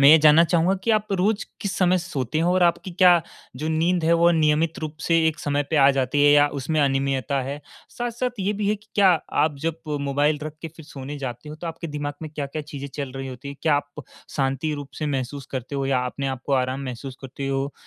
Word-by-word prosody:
मैं 140 - +8
ये 155 - +10
जानना 155 +1 +7
चाहूँगा 170 +2 +2
कि 230 - +2
आप 215 -1 +2
रोज़ 200 +3 +1 0.2
किस 200 - -2
समय 185 0 +3
सोते 155 -6 -3
हैं 165 - +1
और 180 +1 +3
आपकी 175 +2 +2
क्या 175 -1 +5 0.3
जो 155 +4 -3
नींद 165 +2 +1
है, 165 - +4
वो 170 +1 +5
नियमित 160 0 +2
रूप 155 -1 -5
से 165 0 +2
एक 160 - -3
समय 145 0 0
पे 160 - +1
आ 140 -1 +7
जाती 135 +1 +1
है 145 - +7
या 145 0 +6
उसमें 155 +3 0
अनियमितता 135 0 +1
है? 140 +3 -5 0.3
साथ-साथ 240 -1 -3
ये 195 +2 +1
भी 205 -1 -1
है 210 - +3
कि 210 +2 -25
क्या 200 -2 +5 0.4
आप 150 -2 -1
जब 165 +1 -1 0.2
मोबाइल 145 +2 +1
रख 155 0 -6
के 165 - -4
फिर 160 - -11
सोने 140 -1 -7
जाते 125 0 -6
हो 150 - -7
तो 170 - -7
आपके 165 +1 -5
दिमाग 145 -1 -4
में 155 - -6
क्या-क्या 150 +1 -4
चीज़ें 140 -1 -7
चल 140 -3 -4
रही 135 0 -5
होती 130 +2 -8
हैं? 140 - -7
क्या 155 -2 +3
आप 145 0 -6 0.3
शांति 135 +2 0
रूप 145 -1 -7
से 155 - -2
महसूस 135 0 -3
करते 130 +3 -6
हो 135 -1 -1
या 130 -2 +1
अपने 140 +2 -4
आप 125 - -20
को 140 - -1
आराम 130 0 +1
महसूस 130 +1 -6
करते 135 +1 -6
हो 135 +1 -1
150 Hz, 240 wpm, -24 LUFS, 135-170 Hz, 0.4 s, ये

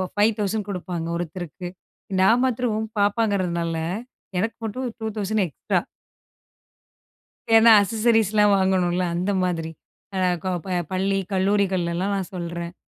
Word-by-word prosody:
ரூ.5000 210 0 +1
குடுப்பாங்க 180 -3 -4
ஒருத்தருக்கு. 175 +1 -6 0.5
நான் 225 +6 +5
மாத்திரம் 225 -3 -1
பாப்பாங்கிறனால 195 -5 +1 0.6
எனக்கு 225 +4 -2
மட்டும் 250 +4 -3
ரூ.2000 215 -2 -1
எக்ஸ்ட்ரா. 145 - -1 1.8
ஏனா 225 +1 +8
அசசரீஸ் 220 0 +2 0.3
வாங்கணும்ல. 185 -2 +1
அந்த 180 +4 0
மாதிரி. 165 -3 -2 0.5
ஆ - - +1 0.2
கோ 185 - -1
ப - - -6 0.2
பள்ளி 195 +1 +1
கல்லூரிகள்லலா 190 -2 +1
நான் 195 0 -4
சொல்றேன். 170 -1 -5
195 Hz, 105 wpm, -23 LUFS, 175-215 Hz, 1.8 s, ஏனா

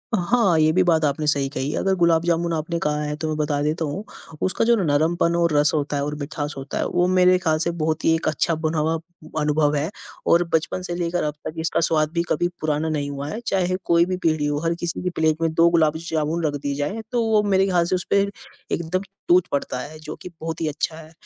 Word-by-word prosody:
हाँ, 195 -2 +2
ये 155 0 +4
भी 185 +3 +3
बात 160 -3 +3
आपने 150 +2 -1
सही 140 -2 +2
कही, 145 +1 -3
अगर 195 0 +1
गुलाब 165 -1 +4
जामुन 170 0 +1
आपने 165 +2 -2
कहा 150 -1 -1
है 150 0 -3
तो 160 - -1
मैं 155 - -1
बता 145 -1 0
देता 155 +2 0
हूँ, 170 +9 -4 0.4
उसका 185 +4 +1
जो 235 +1 +5
नरमपन 165 +3 +2
और 170 -2 +2
रस 145 0 +4
होता 145 -1 -1
है 140 - -1
और 150 +1 -3
मिठास 145 +1 -4
होता 135 0 -5
है, - - 0
वो 180 0 +1
मेरे 185 0 +5
ख़्याल 160 -3 +1
से 170 +2 0
बहुत 155 0 -1
ही 165 - +5
एक 165 - -3
अच्छा 160 +1 +1
बना 160 0 -2
हुआ 160 +2 +1 0.5
अनुभव 150 0 +2
है 145 +3 0 0.4
और 170 +1 +5
बचपन 160 +3 0
से 175 -1 -4
लेकर 175 0 -1
अब 150 - -1
तक - - -5
इसका 165 0 0
स्वाद 155 -2 +1
भी 170 -1 +1
कभी 175 +3 +1
पुराना 155 +1 0
नहीं 145 -2 -2
हुआ 140 0 -5
है। 220 - -4
चाहे 185 -1 +1
कोई 170 0 +4
भी 185 0 -2
पीढ़ी 155 -4 +1
हो, 145 0 0
हर 165 0 +1
किसी 170 0 -3
की 180 - 0
प्लेट 160 -2 0
में 165 -1 +1
2 165 +1 +5
गुलाब 160 -2 +3
जामुन 160 0 -2
रख 145 -1 0
दी 140 0 -2
जाएँ, 150 +10 -2
तो 240 -2 +1
वो 215 -1 +3
मेरे 195 -1 +3
ख़्याल 175 -2 +2
से 185 - 0
उस 180 - -2
पे 200 - +4 0.5
एकदम 170 +3 -1 0.3
टूट 180 0 +4
पड़ता 135 -2 -2
है, 155 +4 -8
जो 155 0 -7
कि 180 - -7
बहुत 165 0 -4
ही 160 - 0
अच्छा 155 +1 -2
है 160 0 -12
160 Hz, 250 wpm, -23 LUFS, 150-175 Hz, 0.5 s, जो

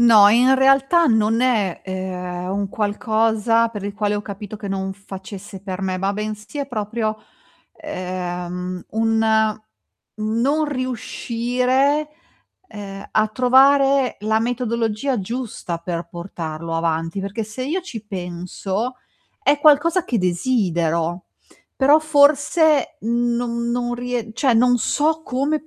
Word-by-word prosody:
No, 220 -4 +8
in 245 +5 +5
realtà 270 +5 +4
non 225 -2 +2
è, 220 -8 +1
ehm, 180 -1 -4
un 200 0 -2
qualcosa 220 +2 +1
per 210 -3 -7
il 200 0 -5
quale 210 -1 0
ho 205 - -2
capito 205 0 -8
che 205 -1 -7
non 195 0 -2
facesse 195 0 -9
per 190 -1 -5
me, 185 -1 -1
ma 195 +1 0
bensì 210 +5 -5
è 280 -1 -3
proprio, 215 -1 -2 0.6
ehm, 180 - -5
un 220 -1 +2 0.6
non 235 +8 +1
riuscire, 255 +2 0 0.6
ehm, 195 -1 -8
a 215 0 +3
trovare 270 +2 +4
la 220 +1 +1
metodologia 235 +1 -1
giusta 210 -4 -4
per 170 0 -4
portarlo 165 -2 -6
avanti. 165 +2 -1
Perché 200 +3 -4
se 215 +4 -6
io 325 +8 -1
ci 235 - -8
penso 190 +5 -4 0.5
è 290 -7 +3
qualcosa 315 +4 +4
che 245 - -1
desidero, 175 -3 0 0.5
però 280 +3 +5
forse 305 0 +3
non 235 +1 -1
non 240 0 -1
rie 240 -2 -4
cioè 250 +1 +2
non 245 +2 +4
so 310 +7 +1
come, 290 +4 -1
220 Hz, 125 wpm, -21 LUFS, 195-255 Hz, 0.6 s, No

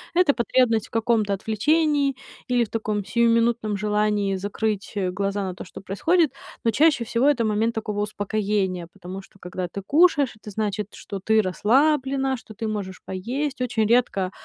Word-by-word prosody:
это 350 -6 +5
потребность 235 -2 +2
в - - -26
каком-то 225 -3 +1
отвлечении 280 - +1 0.4
или 245 -1 +4
в 215 - -6
таком 215 -2 -2
сиюминутном 230 -1 +2
желании 210 -1 +1
закрыть 205 +2 -3 0.2
глаза 200 +1 -2
на 185 -1 -3
то, - - -8
что 180 - -11
происходит. 315 - +2 0.3
Но 230 - +3
чаще 290 -1 +3
всего 235 +3 0
это 250 -6 +3
момент 220 +2 +1
такого 210 -1 -2
успокоения. 205 -4 -1
Потому 190 0 -8
что 195 - -21
когда 180 0 -5
ты 200 +3 -6
кушаешь, 290 - +4
это 210 -1 -11
значит, 210 -1 -2
что 195 - -7
ты 220 +3 +3
расслаблена, 265 - +2
что 220 - -13
ты 225 +1 -4
можешь 195 -3 -4
поесть. 255 +9 -3
Очень 225 -4 +1
редко, 220 -6 +2
220 Hz, 160 wpm, -24 LUFS, 200-250 Hz, 0.4 s, это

